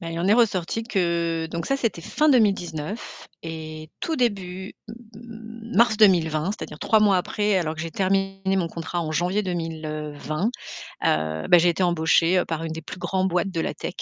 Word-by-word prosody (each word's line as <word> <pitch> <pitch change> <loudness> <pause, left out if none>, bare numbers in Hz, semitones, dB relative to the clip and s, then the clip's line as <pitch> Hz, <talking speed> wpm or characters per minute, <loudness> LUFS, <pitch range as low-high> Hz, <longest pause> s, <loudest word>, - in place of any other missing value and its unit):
Mais 165 -1 -6
il 165 - -4
en 180 - +1
est - - +6
ressorti 225 -2 +1
que 170 -6 0
donc 170 0 -4
ça 275 - +1
c'était 230 -9 -2
fin 305 - +1
2019 200 - 0 0.2
et 155 -1 -7
tout 325 - -1
début, 190 -6 -2
m - - -7 0.2
m 225 0 -10
mars 235 0 +5
2020, 165 -7 +4
c'est-à-dire - - -8
3 220 - +3
mois 205 -2 +5
après, 205 +2 0
alors 160 -3 -2
que 160 - -7
j'ai 165 - -4
terminé 195 +1 0
mon 175 -3 0
contrat 170 +1 -4
en 155 -1 -4
janvier 180 +6 +1
2020, 155 0 -3 0.6
heu, 80 0 0
ben 175 - +7
j'ai 175 +1 +4
été 175 +2 0
embauchée 175 +1 +3
par 165 0 -3
une 165 - -4
des 160 0 -5
plus 165 - -9
grands 190 +1 0
boîtes 180 +1 0
de 165 -3 -1
la - - -2
tech 175 - -6
180 Hz, 195 wpm, -24 LUFS, 165-205 Hz, 0.6 s, ben